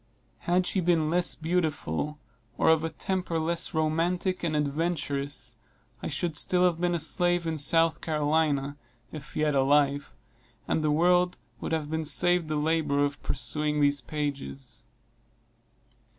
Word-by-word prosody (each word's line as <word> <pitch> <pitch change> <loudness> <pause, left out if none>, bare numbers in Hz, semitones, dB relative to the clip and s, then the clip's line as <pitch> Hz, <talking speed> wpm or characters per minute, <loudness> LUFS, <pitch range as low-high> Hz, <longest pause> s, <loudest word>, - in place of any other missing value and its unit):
Had 180 +1 +3
she 190 - -1
been 165 -3 +1
less 175 0 +1
beautiful, 155 - -2 0.4
or - - +3
of 160 -1 +4
a 165 - -1
temper 180 +1 -3
less 165 +2 -1
romantic 170 +4 0
and 160 -3 -1
adventurous, 145 -2 -2 0.4
I - - -4
should 170 -3 -3
still 180 +4 +2
have 175 -2 +1
been 175 -1 +1
a - - -1
slave 175 +2 +3
in 165 -1 -1
South 165 +2 +4
Carolina, 150 -2 0 0.3
if 150 -1 -10
yet 150 -1 +1
alive, 140 -1 +2 0.5
and 155 - 0
the 155 - +1
world 180 +3 +2 0.2
would - - -5
have 155 -2 -2
been 160 0 -1
saved 175 +3 +3
the 155 - -2
labor 150 -2 +1
of 140 -1 -5
perusing 150 +3 -2
these 145 -1 +2
pages. 135 -3 -6
155 Hz, 145 wpm, -27 LUFS, 145-170 Hz, 0.5 s, of